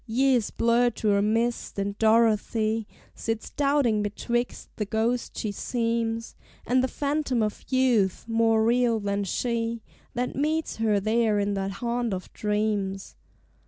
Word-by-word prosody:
Years 245 Hz, -1 st, +2 dB
blur 235 Hz, +1 st, +3 dB
to 215 Hz, -2 st, 0 dB
a 200 Hz, -, +3 dB
mist; 230 Hz, +3 st, 0 dB
and 200 Hz, 0 st, -2 dB
Dorothy 220 Hz, 0 st, +2 dB, 0.3 s
Sits 225 Hz, -1 st, -4 dB
doubting 280 Hz, -7 st, +2 dB
betwixt 240 Hz, +4 st, -3 dB
the 210 Hz, -, -1 dB
ghost 225 Hz, +4 st, -1 dB
she 215 Hz, -, -2 dB
seems, 230 Hz, +1 st, -2 dB, 0.3 s
And 255 Hz, +1 st, +2 dB
the -, -, +2 dB
phantom 280 Hz, -4 st, -1 dB
of 210 Hz, -1 st, -3 dB
youth, 245 Hz, -8 st, +2 dB
more 225 Hz, -1 st, +3 dB
real 235 Hz, -1 st, +3 dB
than 200 Hz, 0 st, -1 dB
she, 230 Hz, +1 st, -2 dB, 0.3 s
That 250 Hz, +1 st, -2 dB
meets 310 Hz, +3 st, -1 dB
her 220 Hz, -2 st, +2 dB
there 220 Hz, +1 st, +2 dB
in 205 Hz, 0 st, 0 dB
that 195 Hz, 0 st, -2 dB
haunt 235 Hz, 0 st, -1 dB
of 185 Hz, -, -9 dB
dreams. 210 Hz, -2 st, -2 dB
225 Hz, 140 wpm, -26 LUFS, 210-240 Hz, 0.3 s, blur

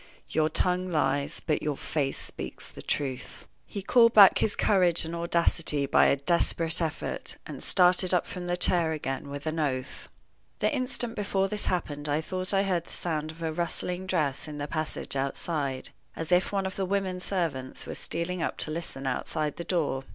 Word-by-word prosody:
"Your 155 Hz, 0 st, +2 dB
tongue 180 Hz, +3 st, 0 dB
lies, 150 Hz, -1 st, 0 dB
but 150 Hz, -, +1 dB
your 150 Hz, -2 st, -2 dB
face 140 Hz, -3 st, -1 dB
speaks -, -, -6 dB
the -, -, -10 dB
truth." 135 Hz, -3 st, -3 dB, 0.2 s
He 200 Hz, -, -6 dB
called 230 Hz, +2 st, +5 dB
back 200 Hz, -3 st, +9 dB
his 210 Hz, -, +2 dB
courage 180 Hz, -5 st, +3 dB
and 165 Hz, -, -5 dB
audacity 170 Hz, -3 st, +1 dB
by 135 Hz, -, +5 dB
a -, -, +4 dB
desperate 165 Hz, +2 st, +1 dB
effort, 160 Hz, -2 st, -3 dB
and -, -, -7 dB
started 180 Hz, 0 st, +4 dB
up 180 Hz, -2 st, +2 dB
from 180 Hz, -1 st, -6 dB
the 175 Hz, 0 st, 0 dB
chair 170 Hz, -2 st, +2 dB
again 140 Hz, -2 st, -4 dB
with 145 Hz, 0 st, -6 dB
an 160 Hz, +1 st, -2 dB
oath. 130 Hz, -3 st, -3 dB, 0.5 s
The -, -, +1 dB
instant 250 Hz, -3 st, 0 dB
before 195 Hz, -2 st, 0 dB
this 210 Hz, -1 st, -1 dB
happened 150 Hz, -4 st, -2 dB
I 145 Hz, +1 st, +2 dB
thought 185 Hz, +3 st, -3 dB
I 195 Hz, -1 st, +3 dB
heard 180 Hz, -4 st, 0 dB
the -, -, -15 dB
sound 155 Hz, -3 st, -2 dB
of 165 Hz, +1 st, -9 dB
a 160 Hz, -1 st, -1 dB
rustling 180 Hz, +2 st, -2 dB
dress 155 Hz, -8 st, 0 dB
in 150 Hz, -1 st, -6 dB
the 145 Hz, 0 st, -3 dB
passage 155 Hz, -2 st, -4 dB
outside, 140 Hz, 0 st, -2 dB, 0.2 s
as 165 Hz, +1 st, -4 dB
if 180 Hz, +1 st, +3 dB
one 195 Hz, -1 st, 0 dB
of 190 Hz, -, -4 dB
the 195 Hz, -, 0 dB
women 190 Hz, -1 st, -1 dB
servants 165 Hz, -9 st, -2 dB
was -, -, -6 dB
stealing 170 Hz, +1 st, -3 dB
up -, -, -2 dB
to 155 Hz, -, -3 dB
listen 155 Hz, -4 st, -5 dB
outside 150 Hz, +3 st, -1 dB
the 170 Hz, -, -4 dB
door. 150 Hz, -7 st, 0 dB
165 Hz, 190 wpm, -28 LUFS, 150-185 Hz, 0.5 s, back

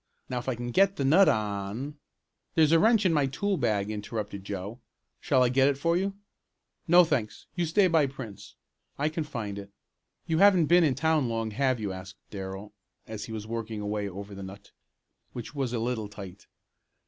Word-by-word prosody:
Now 125 Hz, -, -1 dB
if 120 Hz, -, -4 dB
I 130 Hz, -, 0 dB
can 120 Hz, +1 st, -5 dB
get 195 Hz, +8 st, +4 dB
the 140 Hz, -, -1 dB
nut 180 Hz, +8 st, +6 dB
on 105 Hz, +7 st, -2 dB, 0.3 s
" -, -, -51 dB
"There's 155 Hz, -2 st, +5 dB
a 165 Hz, -, +6 dB
wrench 220 Hz, +2 st, +4 dB
in 175 Hz, -, +4 dB
my 145 Hz, -3 st, +2 dB
tool 200 Hz, +9 st, -1 dB
bag," 110 Hz, -, 0 dB
interrupted 105 Hz, -2 st, -5 dB
Joe. 100 Hz, +4 st, -6 dB, 0.4 s
"Shall 130 Hz, -, +3 dB
I 125 Hz, -, +3 dB
get 135 Hz, +2 st, +4 dB
it 140 Hz, -1 st, +1 dB
for 165 Hz, +4 st, +1 dB
you?" 195 Hz, +2 st, -1 dB, 0.7 s
"No, 175 Hz, +2 st, +8 dB
thanks, 120 Hz, -10 st, -2 dB
you 175 Hz, -2 st, 0 dB
stay 195 Hz, +5 st, +4 dB
by 160 Hz, -5 st, +3 dB
Prince. 125 Hz, -7 st, -9 dB, 0.4 s
I 150 Hz, +2 st, +1 dB
can 160 Hz, +1 st, -3 dB
find 110 Hz, -9 st, -5 dB
it. 100 Hz, 0 st, -10 dB, 0.6 s
You 160 Hz, -1 st, 0 dB
haven't 195 Hz, -5 st, +6 dB
been 175 Hz, +3 st, +5 dB
in 145 Hz, -5 st, +2 dB
town 155 Hz, -2 st, +1 dB
long, 115 Hz, -1 st, -2 dB
have 130 Hz, +1 st, +1 dB
you?" 105 Hz, -3 st, -3 dB
asked 95 Hz, +1 st, -9 dB
Darrell, 95 Hz, +1 st, -7 dB, 0.3 s
as 110 Hz, -1 st, -6 dB
he -, -, -9 dB
was 110 Hz, -1 st, -5 dB
working 115 Hz, -1 st, -4 dB
away 105 Hz, 0 st, -2 dB
over 100 Hz, +2 st, -8 dB
the 100 Hz, -, -8 dB
nut, 100 Hz, +1 st, -10 dB, 0.6 s
which 120 Hz, +2 st, -7 dB
was 135 Hz, -4 st, -2 dB
a 120 Hz, -, -1 dB
little 115 Hz, -2 st, -2 dB
tight. 100 Hz, -2 st, -10 dB
120 Hz, 200 wpm, -28 LUFS, 105-155 Hz, 0.7 s, No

